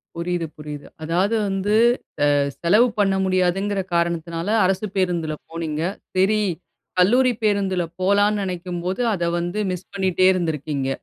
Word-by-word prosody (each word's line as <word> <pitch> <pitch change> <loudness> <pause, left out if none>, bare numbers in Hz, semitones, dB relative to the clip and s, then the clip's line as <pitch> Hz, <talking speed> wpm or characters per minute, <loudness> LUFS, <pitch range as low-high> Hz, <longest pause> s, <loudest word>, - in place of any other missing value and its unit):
புரியுது, 170 0 -2
புரியுது. 150 -1 -8 0.2
அதாவது 180 +7 +1
வந்து, 195 +2 0 0.6
அ, - - +4 0.3
செலவு 210 +8 +5
பண்ண 195 -1 +3
முடியாதுங்கிற 190 +2 +1
காரணத்தினால 170 0 -1 0.2
அரசு 190 +3 +1
பேருந்துல 175 -4 0
போனீங்க. 160 -2 -4 0.3
சரி. 200 +3 +3 0.6
கல்லூரி 250 +7 +4
பேருந்துல 200 -4 +1 0.2
போலான்னு 205 +2 +3
நெனைக்கும்போது, 180 +1 -4
அத 175 -3 -2
வந்து 175 +4 -3
மிஸ் 180 0 -6
பண்ணிட்டே 185 -1 +2
இருந்திருக்கீங்க. 155 -6 -2
185 Hz, 120 wpm, -22 LUFS, 170-195 Hz, 0.6 s, செலவு